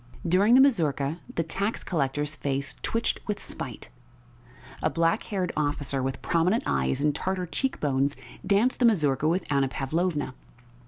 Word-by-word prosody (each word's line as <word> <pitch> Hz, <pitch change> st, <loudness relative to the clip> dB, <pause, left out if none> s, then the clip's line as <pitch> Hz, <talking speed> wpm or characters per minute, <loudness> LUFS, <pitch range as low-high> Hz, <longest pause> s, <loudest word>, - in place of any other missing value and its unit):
During 200 Hz, +7 st, +5 dB
the 265 Hz, -, +8 dB
mazurka 160 Hz, -, +2 dB, 0.2 s
the 165 Hz, -, +1 dB
tax 200 Hz, +7 st, -2 dB
collector's 145 Hz, -2 st, -1 dB
face 140 Hz, -2 st, -2 dB
twitched 230 Hz, +1 st, -1 dB
with 210 Hz, -, -2 dB
spite. 120 Hz, -5 st, -6 dB, 0.9 s
A -, -, +2 dB
black 165 Hz, +5 st, +1 dB
haired 190 Hz, -4 st, -2 dB
officer 145 Hz, -2 st, -1 dB
with 130 Hz, 0 st, -3 dB
prominent 180 Hz, +6 st, +2 dB
eyes 65 Hz, -, 0 dB
and 150 Hz, 0 st, +2 dB
Tartar 185 Hz, +2 st, -2 dB
cheekbones 145 Hz, -, 0 dB, 0.3 s
danced 210 Hz, +6 st, +2 dB
the 250 Hz, -, +4 dB
mazurka 155 Hz, -, +2 dB
with 175 Hz, +3 st, +1 dB
Anna 140 Hz, -1 st, +3 dB
Pavlovna. 145 Hz, +1 st, -1 dB
155 Hz, 145 wpm, -27 LUFS, 140-190 Hz, 0.9 s, the